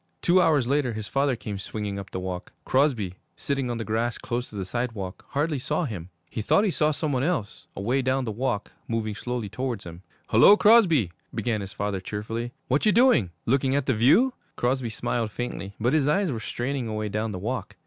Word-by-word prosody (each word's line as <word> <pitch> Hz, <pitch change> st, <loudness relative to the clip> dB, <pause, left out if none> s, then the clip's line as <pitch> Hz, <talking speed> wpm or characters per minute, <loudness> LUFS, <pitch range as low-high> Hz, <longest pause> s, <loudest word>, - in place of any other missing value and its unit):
Two 180 Hz, +1 st, +5 dB
hours 145 Hz, -8 st, +3 dB
later, 140 Hz, -3 st, +1 dB
his 110 Hz, -1 st, -5 dB
father 140 Hz, -1 st, +1 dB
came 105 Hz, -3 st, -6 dB
swinging 100 Hz, 0 st, -4 dB
up 100 Hz, -, -8 dB
the 95 Hz, -, -4 dB
walk. 90 Hz, -1 st, -5 dB
Crosby, 130 Hz, -9 st, +2 dB, 0.2 s
sitting 135 Hz, -3 st, -2 dB
on 120 Hz, -, -2 dB
the 115 Hz, -, -4 dB
grass 115 Hz, +2 st, -1 dB
close 120 Hz, +1 st, -3 dB
to -, -, -12 dB
the 95 Hz, -2 st, -3 dB
sidewalk, 105 Hz, -3 st, -4 dB
hardly 145 Hz, 0 st, 0 dB
saw 150 Hz, +6 st, -1 dB
him. 95 Hz, -, -6 dB, 0.2 s
He -, -, -4 dB
thought 200 Hz, -, +3 dB
he 205 Hz, -, +2 dB
saw 155 Hz, -2 st, +2 dB
some 155 Hz, 0 st, -1 dB
one 130 Hz, -2 st, +1 dB
else 135 Hz, -, -2 dB
away 120 Hz, +7 st, 0 dB
down 130 Hz, 0 st, 0 dB
the 110 Hz, -, -2 dB
walk 105 Hz, -2 st, -2 dB, 0.2 s
moving 110 Hz, -2 st, -1 dB
slowly 120 Hz, 0 st, -3 dB
towards 125 Hz, 0 st, -3 dB
him. 85 Hz, +1 st, -9 dB, 0.3 s
'Hullo, 120 Hz, -, +7 dB
Crosby,' 185 Hz, -, +5 dB, 0.2 s
began 115 Hz, -4 st, -1 dB
his 100 Hz, 0 st, -6 dB
father 100 Hz, -2 st, -2 dB
cheerfully. 115 Hz, +5 st, -4 dB, 0.2 s
'What 135 Hz, +3 st, +1 dB
you -, -, +6 dB
doing? 235 Hz, -, +5 dB, 0.2 s
Looking 135 Hz, +2 st, +2 dB
at 140 Hz, -2 st, +1 dB
the 130 Hz, -, +2 dB
view?' 145 Hz, -, +4 dB, 0.2 s
Crosby 125 Hz, 0 st, 0 dB
smiled 110 Hz, 0 st, -2 dB
faintly, 100 Hz, -4 st, -5 dB
but 120 Hz, +3 st, +1 dB
his 150 Hz, -3 st, +3 dB
eyes 180 Hz, +3 st, +2 dB
were 115 Hz, -, -3 dB
straining 125 Hz, +2 st, -3 dB
away 110 Hz, -1 st, -2 dB
down 110 Hz, +2 st, -2 dB
the 95 Hz, -, -4 dB
walk. 120 Hz, +8 st, -4 dB
120 Hz, 210 wpm, -26 LUFS, 105-140 Hz, 0.3 s, Hullo